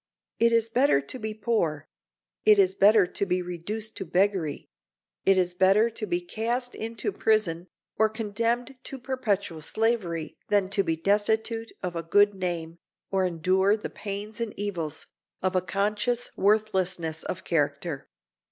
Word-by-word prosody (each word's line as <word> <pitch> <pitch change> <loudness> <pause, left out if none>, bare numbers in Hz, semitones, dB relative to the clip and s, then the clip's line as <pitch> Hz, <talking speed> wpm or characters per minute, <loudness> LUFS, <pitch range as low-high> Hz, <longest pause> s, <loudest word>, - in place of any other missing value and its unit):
It 230 +1 +4
is 230 -1 +3
better 245 - +3
to 140 - -6
be 215 -1 -4
poor; 205 -10 -1 0.6
it 215 -1 +6
is 190 -1 +4
better 205 +1 +6
to 180 - -3
be 180 0 0
reduced 205 +6 -5
to - - -3
beggary; 180 -3 0 0.6
it 195 0 +6
is 180 -1 +1
better 195 +5 +4
to 215 -1 -4
be 175 -1 0
cast 235 +7 -2
into 230 - -4
prison, 185 - +1 0.3
or 220 0 +5
condemned 230 +4 -2
to 270 - -6
perpetual 210 -10 -2
slavery 175 -5 -1
than 200 -2 +2
to 195 0 +2
be 165 -4 0
destitute 220 +5 +1
of 180 -1 -3
a 165 - -1
good 205 +5 +4
name, 170 -3 -4 0.3
or 190 -1 +2
endure 185 +4 +2
the 210 - -6
pains 210 +2 -6
and 230 -3 -4
evils 170 -7 -4 0.4
of 185 0 +1
a 185 - +3
conscious 210 +6 -1
worthlessness 190 -6 +1
of - - -5
character. 150 -1 -1
200 Hz, 150 wpm, -27 LUFS, 175-220 Hz, 0.6 s, it